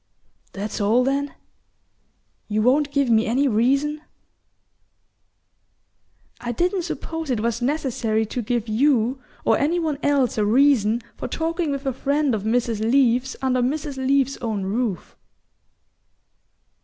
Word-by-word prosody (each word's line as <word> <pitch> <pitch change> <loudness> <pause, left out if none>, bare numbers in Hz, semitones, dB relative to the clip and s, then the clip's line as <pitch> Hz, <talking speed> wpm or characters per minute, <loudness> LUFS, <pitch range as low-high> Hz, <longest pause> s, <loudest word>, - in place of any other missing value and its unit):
"That's 205 +2 -4
all 225 +5 +3
then? 275 +2 -1 1.1
You 215 0 0
won't 280 +4 +3
give 280 -4 +1
me 225 0 +3
any 265 +5 +2
reason?" 275 +6 +1 2.4
"I 240 - -4
didn't 360 - 0
suppose 325 -1 -5
it 245 -4 0
was 235 +1 -1
necessary 240 -5 0
to 245 +3 -4
give 235 0 -2
you 250 +2 +1 0.2
or - - +3
any 315 +5 +1
one 315 -4 -1
else 275 -6 +1
a - - +3
reason 235 -1 +3
for - - -4
talking 330 0 -2
with 275 0 -3
a 270 - 0
friend 280 +1 0
of 215 - -1
Mrs. 225 0 0
Leath's 250 +2 +2
under 255 -1 +1
Mrs. 285 +2 -2
Leath's 270 0 +1
own 220 -5 -3
roof." 205 -2 -3
255 Hz, 130 wpm, -22 LUFS, 225-285 Hz, 2.4 s, all